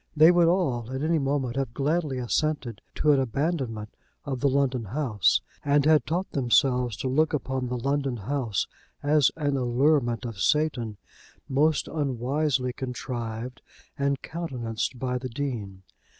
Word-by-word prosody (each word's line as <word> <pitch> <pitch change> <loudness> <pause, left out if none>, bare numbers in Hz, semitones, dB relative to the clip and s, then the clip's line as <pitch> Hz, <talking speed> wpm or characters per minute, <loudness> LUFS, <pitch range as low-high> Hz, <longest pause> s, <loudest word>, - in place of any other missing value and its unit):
They 160 +3 +8
would 175 -1 +4
all, 130 -10 +1
at 130 +2 -3
any 160 0 +2
moment, 135 -3 -1
have 130 -4 -2
gladly 150 -1 0
assented 125 -2 -1
to 150 - +3
an 140 - +4
abandonment 130 -4 -2 0.3
of 135 -3 -3
the 140 - +3
London 130 -3 +1
house, 110 -3 +1 0.2
and 145 0 +3
had 155 -1 +4
taught 175 +4 -1
themselves 125 -3 +2
to - - -3
look 155 +4 +2
upon 130 -2 -2
the 125 0 -2
London 135 0 -1
house 115 -1 -1 0.4
as 145 -1 +4
an 145 -3 0
allurement 125 -1 +2
of 115 -5 -5
Satan, 125 -8 +1 0.5
most 150 +3 +2
unwisely 135 -1 0
contrived 125 -2 -5 0.3
and 140 -1 0
countenanced 130 -8 -3
by 125 0 -2
the 130 0 -5
Dean. 115 -8 -4
135 Hz, 145 wpm, -26 LUFS, 120-150 Hz, 0.5 s, They